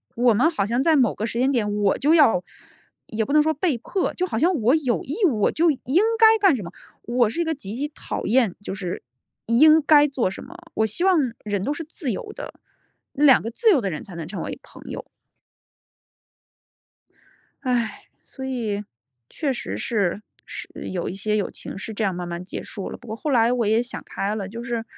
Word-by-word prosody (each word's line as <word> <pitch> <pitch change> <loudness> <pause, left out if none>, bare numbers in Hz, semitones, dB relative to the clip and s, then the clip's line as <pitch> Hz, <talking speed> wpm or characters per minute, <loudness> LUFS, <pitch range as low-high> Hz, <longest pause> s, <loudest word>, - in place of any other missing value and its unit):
我 240 0 +4
们 250 +10 +3
好 320 -12 -1
像 235 +5 0
在 325 0 +4
某 250 -7 +3
个 215 - -3
时 230 +1 -3
间 260 +2 +3
点 220 -6 0
我 205 -1 +1
就 295 +3 +3
要 230 - +5 0.6
也 220 0 -2
不 280 - -3
能 305 - +6
说 315 +1 +1
被 305 -3 0
迫。 370 - -2
就 365 - -1
好 225 - -3
像 345 +5 +3
我 245 +7 +4
有 265 -7 0
义 285 - -5
务， 255 -11 +1
我 - - +3
就 330 0 +3
应 285 - +1 0.2
该 445 0 +7
干 390 -7 +5
什 220 - -5
么。 170 - -8 0.3
我 240 -1 +2
是 290 +10 -2
一 - - +2
个 320 -1 -1
极 215 -7 -7
其 285 +4 -2
讨 300 - -6
厌， 230 -4 +2
就 205 - -5
是 185 -3 -5 0.4
应 305 +7 +6
该 295 0 +6
做 270 -8 0
什 - - -8
么。 340 - -12 0.2
我 220 - +2
希 220 - -1
望 380 -2 +5 0.3
人 205 -2 -2
都 285 - -1
是 330 - -5
自 300 -4 -4
由 190 - -5
的， - - -8 0.6
两 280 -3 +6
个 225 - -4
自 450 - +2
由 300 -10 +4
的 200 - -1
人 155 -4 -5
才 185 - -10
能 165 -2 -6
成 195 - -5
为 - - -6
朋 - - -15
友。 - - -5 2.6
唉， 245 -4 -1 0.2
所 265 - -10
以， 230 -6 -2 0.5
确 290 -3 -2
实 - - -4
是 205 -5 -1 0.2
是 - - -7 0.2
有 180 -2 -3
一 - - -3
些 210 +2 0
友 200 - -1
情 - - -7
是 220 +3 -5
这 215 - -2
样 195 -2 +1
慢 175 0 -5
慢 175 +1 -5
结 185 - -6
束 195 - -6
了。 - - -7
不 - - -16
过 220 - -4
后 295 +6 -3
来 235 -1 +4
我 240 -2 0
也 220 +2 +3
想 245 - -6
开 200 +2 -3
了， 200 -2 -4
就 230 +2 -7
是， 235 -1 -3
240 Hz, 240 characters per minute, -23 LUFS, 210-295 Hz, 2.6 s, 该